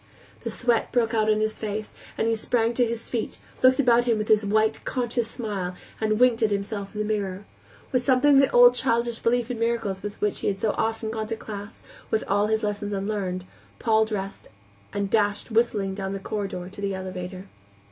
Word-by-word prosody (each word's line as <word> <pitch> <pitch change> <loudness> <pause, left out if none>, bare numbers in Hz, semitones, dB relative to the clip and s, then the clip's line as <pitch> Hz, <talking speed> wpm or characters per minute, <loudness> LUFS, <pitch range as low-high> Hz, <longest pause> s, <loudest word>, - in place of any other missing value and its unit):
The - - -2
sweat 240 -2 +1
broke 235 -2 +1
out 215 -1 +2
on 215 0 +3
his 215 0 -1
face, 215 0 -4 0.2
and - - +1
he 230 - +2
sprang 230 +1 +1
to 245 0 +2
his 230 0 -4
feet, 235 -3 -3 0.2
looked 255 +1 +5
about 240 -3 +4
him 235 -3 +2
with 215 0 -3
his 215 0 +5
white, 215 +2 +1
conscious 240 -2 -1
smile, 200 -7 -4 0.2
and 215 0 +1
winked 245 -2 +4
at 220 - +4
himself 200 0 -3
in 210 - -1
the - - -1
mirror, 200 -2 -2 0.5
With 255 -1 +1
something 260 +3 +4
of 275 - +7
the 275 - +4
old 245 0 +7
childish 235 -2 0
belief 240 +1 +1
in 240 - -4
miracles 230 -5 -1
with 205 0 -6
which 210 -1 0
he - - -2
had 195 -1 0
so 215 - +1
often 225 0 -1
gone 220 -1 -3
to 225 - -2
class, 205 -2 -8 0.4
all 205 +1 +2
his 220 0 0
lessons 205 0 -2
unlearned, 195 -2 -2 0.3
Paul 220 -2 +3
dressed 200 -2 -5 0.4
and 200 0 -1
dashed 205 +2 0
whistling 215 -4 +1
down 195 0 -4
the 195 - -3
corridor 195 -3 -4
to 195 +2 -10
the 195 -1 -1
elevator. 185 0 -6
215 Hz, 205 wpm, -25 LUFS, 200-235 Hz, 0.5 s, of